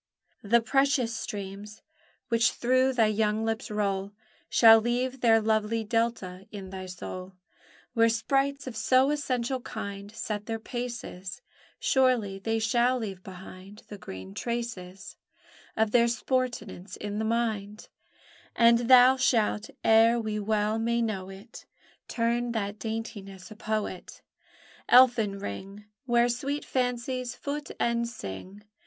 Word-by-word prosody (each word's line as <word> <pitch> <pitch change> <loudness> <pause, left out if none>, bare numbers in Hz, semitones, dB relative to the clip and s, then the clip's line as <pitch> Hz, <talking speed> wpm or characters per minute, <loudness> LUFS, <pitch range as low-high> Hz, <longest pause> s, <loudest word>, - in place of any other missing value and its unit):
The 235 +3 +3
precious 265 -1 +1
streams 205 +1 -7 0.5
which 230 0 +3
through 255 +2 +2
thy 235 -3 +3
young 215 +1 +1
lips 225 +3 -2
roll 200 -1 -2 0.4
Shall 225 -1 +7
leave 250 +3 -1
their 225 -2 +5
lovely 220 +1 0
delta 215 -4 -2
in 195 -3 -8
thy 190 -1 -7
soul: 185 +1 -7 0.6
Where 230 -1 +4
sprites 275 +5 0
of 255 -3 -6
so 255 +5 +3
essential 260 -3 -1
kind 200 -2 -7
Set 210 -1 -5
their 225 -1 -2
paces, 240 - -6 0.4
Surely 245 -7 +2
they 225 +3 -1
shall 240 +3 +2
leave 200 -6 -5
behind 190 +2 -12
The 205 - -9
green 95 - -9
traces 225 - -5 0.6
Of 220 -1 +2
their 235 0 +5
sportance 230 -6 -2
in 205 0 -4
the - - -1
mind; 220 -2 -2 0.7
And 235 +1 +4
thou 255 +1 +8
shalt, 225 -4 +1
ere 225 +1 +5
we 215 -2 -3
well 215 +1 0
may 235 +1 +1
know 195 -4 -3
it, 195 +5 -12 0.4
Turn 235 +1 -1
that 210 -2 -3
daintiness, 215 -3 -6
a - - -9
poet, 215 -4 -4 0.7
Elfin 240 -5 +5
ring 195 - -7 0.2
Where 240 0 +4
sweet 275 +5 -3
fancies 250 0 -2
foot 290 +1 -5
and 235 0 0
sing. 185 - -8
225 Hz, 130 wpm, -28 LUFS, 205-240 Hz, 0.7 s, thou